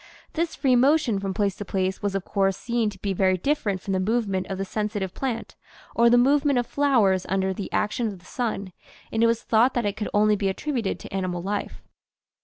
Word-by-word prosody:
This 330 0 -1
free 260 -3 +3
motion 255 -4 +3
from 195 -1 -3
place 200 -1 0
to - - -4
place 190 -1 -2
was 205 -1 -1
of 195 - -2
course 195 -2 +1
seen 235 -2 0
to 200 - -11
be 200 -1 0
very 185 0 +2
different 210 - -1
from 195 - -3
the 190 - +1
movement 200 -2 0
of 195 - -4
the 195 - -2
sensitive 205 -2 -3
plant 250 -4 -4 0.4
or 235 0 +5
the 240 - +5
movement 280 +2 +3
of 245 - +1
flowers 230 -11 +2
under 190 0 +1
the 195 +1 -6
action 225 +3 0
of 200 -3 -5
the 180 - -21
sun, 210 -6 -3 0.4
and 225 0 +1
it - - +6
was 230 0 0
thought 235 +4 +3
that 240 -3 0
it 205 0 -1
could 210 - -3
only 210 0 +4
be 200 -1 0
attributed 240 +1 -2
to - - -10
animal 185 -2 -2
life. 200 +1 -4
210 Hz, 220 wpm, -25 LUFS, 195-240 Hz, 0.4 s, it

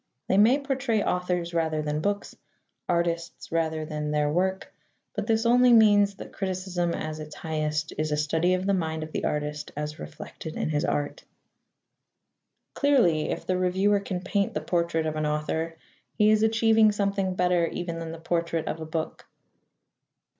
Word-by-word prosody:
They 190 - +3
may 235 +6 +6
portray 265 -6 0
authors 180 -1 -1
rather 160 -2 0
than 150 0 -1
books, 205 +3 -2 0.5
artists 170 -1 -1
rather 160 -1 0
than 150 -1 -3
their 150 0 +1
work, 190 +2 -1 0.4
but - - -3
this 225 0 +2
only 245 +1 +6
means 205 -3 +5
that - - -10
criticism 185 -2 -2
at 155 0 -4
its 155 0 -8
highest 155 -1 -2
is 155 0 0
a 150 - +1
study 160 +4 +2
of 185 +1 -3
the 200 - +2
mind 160 -4 -1
of 155 - -8
the - - -2
artist 150 0 -3
as 150 0 -4
reflected 75 - -8
in - - -1
his 150 +2 0
art. 145 -4 -2 1.5
Clearly, 240 - +3
if - - -3
the 185 0 0
reviewer 190 +3 +2
can 185 -2 -4
paint 200 +2 -1
the 155 - -1
portrait 170 0 0
of 155 0 -2
an 155 0 0
author, 160 +2 -2 0.4
he 210 0 +4
is 215 0 +4
achieving 220 -1 +4
something 200 -2 -1
better 180 -2 +2
even 170 -1 -4
than 165 -1 -5
the 165 - -7
portrait 165 0 -1
of 165 - -3
a 160 - -6
book. 160 0 -4
170 Hz, 170 wpm, -26 LUFS, 155-200 Hz, 1.5 s, may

